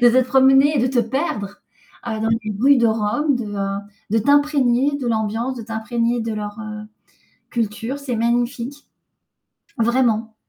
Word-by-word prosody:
De 240 - +8
te 255 +2 +4
promener 270 +3 +5
et - - +2
de 250 - +2
te 255 -1 0
perdre, 225 - -3 0.5
heu 220 -2 -3
dans 225 - 0
les 225 -1 -1
rues 280 +2 +6
de 235 - +3
Rome, 225 +6 +1
de 245 - -4
heu 195 0 -2 0.3
de 225 - +3
t'imprégner 285 0 +2
de 255 - -4
l'ambiance, 225 +3 -1
de 230 - -6
t'imprégner 230 +2 -1
de 225 0 -3
leur, 210 0 -6
heu, 215 0 -7 0.7
culture. 230 +4 -3
C'est 265 -4 -4
magnifique, 240 +4 -1 0.9
vraiment. 230 -2 +1
235 Hz, 160 wpm, -20 LUFS, 220-265 Hz, 0.9 s, De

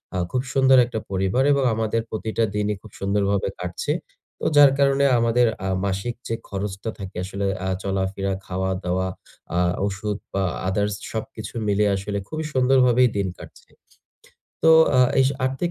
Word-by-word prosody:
আ - - 0
খুব 125 - 0
সুন্দর 135 -1 +5
একটা 120 -2 -4
পরিবার 95 +7 +1
এবং 140 - +1
আমাদের 115 +1 0
প্রতিটা 110 +1 -2
দিনই 105 0 0
খুব - - -14
সুন্দরভাবে 100 0 0
কাটছে। 90 +10 -3 0.5
তো - - -5
যার 145 -2 +8
কারণে 140 0 +3
আমাদের 115 +1 +3 0.2
আ - - 0 0.2
মাসিক 100 +5 -2
যে, - - -2 0.2
খরচটা 100 +2 -4
থাকে 95 -2 -7
আসলে 100 +1 -4 0.2
আ - - 0
চলাফেরা, 95 0 -1
খাওয়া-দাওয়া, 95 0 -2 0.5
আ - - +3 0.3
ওষুধ 100 +1 -3 0.2
বা 95 - 0 0.3
আদার্স, 105 +2 0 0.2
সবকিছু 110 -1 -6
মিলিয়ে 105 0 +2
আসলে 100 +1 -4
খুবই 155 0 -4
সুন্দরভাবে 125 -1 +4
দিন 100 - 0
কাটছে। - - -14 1.0
তো 160 - +7 0.3
আ - - +7 0.2
এই - - +5 0.2
আর্থিক 135 +7 -2
105 Hz, 155 wpm, -23 LUFS, 95-125 Hz, 1.0 s, যার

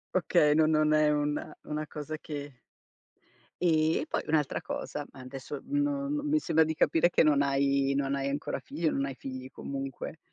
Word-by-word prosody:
Okay, 170 -5 +4
no 160 0 +5
non 155 -1 +3
è 155 0 +4
una 150 0 -1
una 155 0 -3
cosa 150 +1 -6
che 145 -4 -7 1.0
Ehm, 160 -2 +3
e - - -4
poi - - -2
un'altra 150 -3 +1
cosa, 150 - -5
ma - - -14
adesso 135 +2 -7
no 285 0 0
no 295 0 -1
mi 300 +1 +2
sembra 160 - +3
di 160 - -1
capire 165 +2 +3
che - - +4
non 150 -2 +4
hai 140 0 +2
non 140 0 0
hai 140 0 -1
ancora 140 0 -3
figli, 150 +5 -3
non 135 -1 0
hai 135 -1 -5
figli 130 0 -7
comunque, 135 +3 -6
150 Hz, 185 wpm, -29 LUFS, 140-160 Hz, 1.0 s, no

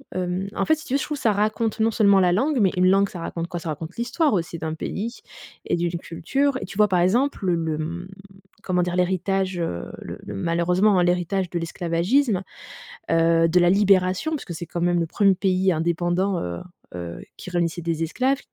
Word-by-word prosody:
Hem, 185 +1 -2
en - - 0
fait, 315 - +4
si 315 - -12
tu 255 - -5
veux, - - +4
je 280 - -2
trouve, 300 -1 -4
ça 230 -5 +2
raconte 215 +2 0
non 225 +1 +3
seulement 200 -3 +4
la 180 -1 +4
langue, 270 - +1
mais 195 -3 +4
une 180 0 +3
langue, 195 +1 +3
ça 180 - -8
raconte 165 0 -4
quoi? 175 0 -5
Ça 165 - -6
raconte 160 +3 -6
l'histoire 255 +4 +1
aussi 170 -2 -2
d'un 160 0 -4
pays 220 +8 -5 0.5
et - - 0
d'une 170 0 -2
culture 270 - -1
et - - -4
tu 195 - -10
vois? 210 0 +5
Par 180 -2 +1
exemple, 225 +5 +1
le 175 -2 +2
le, 160 -2 -2
mmh, 170 +4 -5 0.6
comment 180 -1 +1
dire? 175 0 -1
L'héritage, 185 0 0
heu, 85 - -3
le - - -7
le, 105 - -7
malheureusement, 180 - +2
hein, - - +3
l'héritage 180 +1 0
de 170 - -2
l'esclavagisme, 180 - 0 0.7
heu, 165 0 +4
de 180 +2 +3
la 175 0 +4
libération, 195 - +3
parce 305 - -3
que 175 - -6
c'est, 170 +1 -6
quand 170 +1 -5
même, 175 0 +2
le 165 - 0
1er 195 +2 +3
pays 190 0 +2
indépendant, 175 +3 0
heu 85 -1 -4 0.4
heu, 85 -1 -6 0.2
qui - - -8
réunissait 175 -1 -1
des 165 -1 -2
esclaves, 260 - 0
180 Hz, 215 wpm, -23 LUFS, 170-200 Hz, 0.7 s, vois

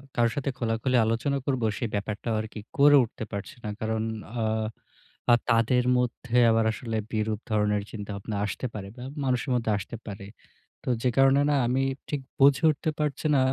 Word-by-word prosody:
কারো 120 -1 +3
সাথে 140 -1 -1
খোলাখুলি 115 +2 0
আলোচনা 115 +5 0
করব 130 -4 0 0.2
সে 120 - -2
ব্যাপারটাও 105 +3 -2
আরকি 110 0 -8 0.2
করে 145 +1 +7
উঠতে 110 0 -6
পারছি 100 +8 -6
না। 105 - -3
কারণ 110 0 -1 0.4
আ - - 0 0.9
আ - - +8 0.2
তাদের 115 +2 +3
মধ্যে 125 0 -1
আবার 115 0 +3
আসলে 115 -1 -4 0.2
বিরূপ 110 -1 -1
ধরনের 105 -1 +1
চিন্তাভাবনা 105 0 -5
আসতে 105 - -4
পারে 100 -2 -6
বা 125 - -8 0.2
মানুষের 130 +1 0
মধ্যে 115 -2 0
আসতে 100 +4 -6
পারে। 100 -1 -7 0.6
তো - - -3
যে 125 - +3
কারণে 135 +1 +5
না 145 - +3
আমি 130 +2 +1 0.3
ঠিক 145 -2 -2 0.2
বুঝে 140 +1 +5
উঠতে 155 +1 -2
পারছি 150 0 -2
না - - +5
115 Hz, 175 wpm, -27 LUFS, 110-130 Hz, 0.9 s, আ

